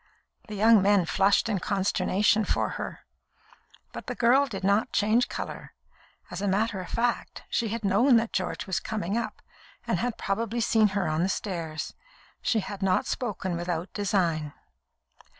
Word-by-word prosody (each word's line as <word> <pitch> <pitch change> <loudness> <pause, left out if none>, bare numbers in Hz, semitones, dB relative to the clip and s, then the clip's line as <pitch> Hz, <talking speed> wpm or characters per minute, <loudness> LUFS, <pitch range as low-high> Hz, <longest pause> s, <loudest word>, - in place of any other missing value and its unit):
The 215 - -6
young 220 +1 +6
men 200 -2 +4
flushed 195 +5 +3
in 210 -4 0
consternation 195 +2 +1
for - - 0
her, - - -6 0.9
but - - -8
the - - -3
girl 265 +4 +4
did 200 -6 -6
not 200 +3 +2
change 220 +4 +2
colour. - - -6 0.6
As 180 +1 -5
a 205 - 0
matter 200 0 0
of 180 - -9
fact, 235 0 -1
she 235 - +1
had 220 0 -3
known 230 +6 +5
that 230 0 -1
George 185 +1 -2
was 190 -3 -1
coming 205 -2 -3
up, 235 - -3 0.4
and - - 0
had 245 -2 -2
probably 225 +4 -2
seen 220 -1 +4
her 195 - 0
on 155 +1 0
the 185 - +1
stairs. 165 -6 -4 0.5
She 230 -3 +1
had 200 0 -7
not 190 -1 +2
spoken 195 -7 -3
without 175 +1 -3
design. 170 -7 0
200 Hz, 165 wpm, -27 LUFS, 185-225 Hz, 0.9 s, young